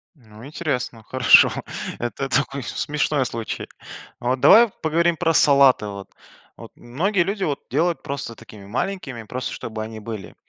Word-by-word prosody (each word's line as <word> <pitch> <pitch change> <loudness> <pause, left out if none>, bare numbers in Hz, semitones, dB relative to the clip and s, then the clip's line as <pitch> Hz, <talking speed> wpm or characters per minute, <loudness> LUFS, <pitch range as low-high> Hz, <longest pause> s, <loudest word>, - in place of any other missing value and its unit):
Ну 110 -4 -15
интересно, 135 -7 -4
хорошо. 130 +2 +6 0.5
Это 120 +3 -3
такой 135 -1 -1
с - - -8
смешной 150 -2 0
случай. 115 -1 -5 0.5
А 120 - -2
вот 130 - 0
давай 235 +1 +8
поговорим 170 +2 +1
про 165 -2 +1
салаты, 140 -7 +5
вот. 100 -1 -8 0.5
Вот, - - -11
многие 175 - 0
люди 195 +1 -3
вот 145 -4 -2
делают 165 +5 0
просто 135 -4 -5
такими 105 -2 -14
маленькими, 130 - -4
просто 125 +4 -5
чтобы 110 -1 -6
они 110 0 -8
были. 105 -3 -8
130 Hz, 155 wpm, -22 LUFS, 115-160 Hz, 0.5 s, давай